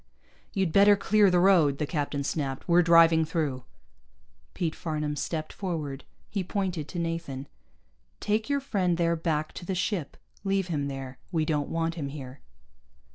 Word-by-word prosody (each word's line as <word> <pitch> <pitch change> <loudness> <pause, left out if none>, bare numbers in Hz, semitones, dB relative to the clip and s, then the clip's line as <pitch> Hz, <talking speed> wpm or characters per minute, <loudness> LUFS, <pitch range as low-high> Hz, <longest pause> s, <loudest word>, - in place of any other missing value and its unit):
"You'd 190 -4 0
better 200 +2 +6
clear 205 0 +4
the 180 - +3
road," 175 -7 +4
the 150 - -1
captain 145 -2 -2
snapped. 135 -2 -3
"We're 175 0 +5
driving 165 -1 +6
through." 150 -5 -2 0.9
Pete 165 -3 -1
Farnam 150 -2 -3
stepped 155 +1 -3
forward. 155 -8 -4 0.2
He 200 -3 -2
pointed 180 -5 -2
to - - -7
Nathan. 165 -5 -3 0.7
"Take 215 +3 0
your 280 0 +1
friend 185 -10 0
there 170 -1 +2
back 155 -2 -1
to - - -8
the 185 +2 -3
ship. 180 -4 -2 0.3
Leave 195 -2 0
him 145 -4 -1
there. 135 -2 -6
We 160 -3 +1
don't 150 -2 -1
want 165 0 -1
him 155 -4 -4
here." 135 -2 -9
165 Hz, 160 wpm, -28 LUFS, 150-185 Hz, 0.9 s, better